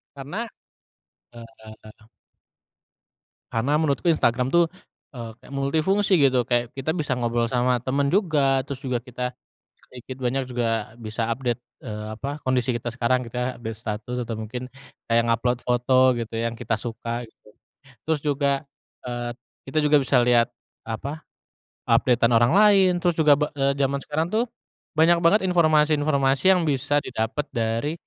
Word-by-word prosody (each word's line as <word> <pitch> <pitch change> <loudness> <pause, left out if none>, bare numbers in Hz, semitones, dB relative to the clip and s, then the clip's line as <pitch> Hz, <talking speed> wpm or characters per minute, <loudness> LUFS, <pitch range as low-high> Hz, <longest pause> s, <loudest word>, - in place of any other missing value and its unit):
karena, 140 +7 -7 1.0
eee 110 -1 -14 1.4
Karena 130 +7 +1
menurutku 155 +2 0
Instagram 125 -5 +2
tuh, 170 +3 +4 0.5
eee, 120 -3 -7
kayak 130 - -14
multifungsi 160 +9 +1
gitu 135 -4 +4
kayak 120 -1 0
kita 135 +3 -2
bisa 150 -5 -1
ngobrol 120 -1 0
sama 125 0 +2
teman 140 +2 +1
juga 145 -8 +2
terus 140 -2 -6
juga 130 -2 -1
kita, 125 0 -5 0.6
sedikit 125 +1 -9
banyak 135 +2 0
juga 115 -3 -2
bisa 110 0 -3
update, 120 0 -2 0.2
eee, 105 0 -6
apa 140 +5 -5
kondisi 130 -1 0
kita 120 0 -3
sekarang 125 +1 0
gitu 115 - -12
kayak 125 0 -2
update 110 -1 -5
status 115 +2 -5
atau 115 - -4
mungkin 115 +3 -5 0.4
kayak 115 0 +3
ngupload 120 +1 +1
foto 125 +1 +1 0.2
gitu 115 -1 -5
yang 115 +1 -2
kita 115 0 -1
suka 120 +1 -4
gitu, 110 - -26 0.6
terus 160 -2 +1
juga, 140 -1 0 0.4
eee, 120 -1 -4 0.4
kita 135 - -4
juga 150 0 +5
bisa 135 -1 +2
lihat, 120 -1 +4 0.4
apa, 135 +7 -5 0.7
update-an 115 0 +3
orang 120 +2 +4
lain, 200 -2 +6
terus 175 -2 +2
juga 150 -2 +6
be 150 +1 0
eee, 135 0 +2
jaman 140 0 0
sekarang 160 +3 -2
tuh, 220 +4 +1 0.5
banyak 165 +2 +4
banget 195 +6 +5
informasi-informasi 150 -5 +2
yang 180 - +1
bisa 145 +1 +1
didapet 120 +5 -3
dari, 115 +5 -1
125 Hz, 150 wpm, -24 LUFS, 115-145 Hz, 1.4 s, lain